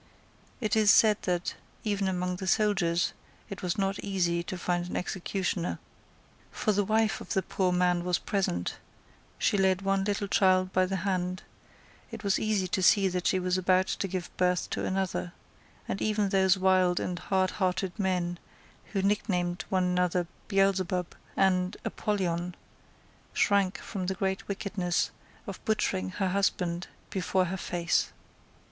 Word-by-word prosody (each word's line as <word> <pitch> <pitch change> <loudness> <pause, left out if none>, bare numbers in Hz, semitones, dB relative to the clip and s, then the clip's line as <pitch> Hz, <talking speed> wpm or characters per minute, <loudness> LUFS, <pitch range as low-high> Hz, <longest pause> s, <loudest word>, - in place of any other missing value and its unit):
It 215 -4 0
is 215 -2 +4
said 215 0 +6
that, 175 0 0 0.3
even 205 -2 0
among 180 -1 -1
the 190 - -5
soldiers, 190 -5 +2 0.4
it 195 - -6
was 180 -2 -1
not 195 0 0
easy 175 -4 0
to 180 +2 -5
find 175 0 -1
an - - -2
executioner. 185 0 -2 0.7
For 215 - 0
the 205 0 +2
wife 220 +1 +1
of - - -5
the 190 - +2
poor 185 -2 0
man 180 -1 +2
was 180 -1 +1
present; 140 - -2 0.6
she 205 - +2
led 190 0 +2
one 195 0 +1
little 200 0 -1
child 185 -1 +3
by 185 0 +3
the 195 - -2
hand: 185 -1 -1 0.7
it 225 -2 -8
was 200 -1 +2
easy 215 -4 0
to 190 - 0
see 195 +1 +5
that 180 -1 -1
she 190 - +3
was 185 0 0
about 185 0 +3
to 195 - -2
give 185 -2 -5
birth 180 -1 +1
to - - -2
another; 185 -2 -2 0.5
and 195 - -3
even 210 -2 +1
those 190 -1 +4
wild 185 -1 +3
and 180 -1 -3
hardhearted 185 +1 0
men, 180 -3 0 0.5
who 195 -2 0
nicknamed 185 -4 0
one 185 -1 +2
another 180 0 +1 0.2
Beelzebub 190 -3 +1 0.2
and 185 -1 +2
Apollyon, 180 -4 -1 0.8
shrank 200 -2 +2
from 185 -4 -5
the 190 - -1
great 190 0 -2
wickedness 195 -3 -1 0.3
of - - -8
butchering 215 - 0
her 190 - -1
husband 180 -2 0 0.2
before 185 0 +1
her 180 +2 -3
face. 175 -2 0
185 Hz, 155 wpm, -29 LUFS, 180-195 Hz, 0.8 s, said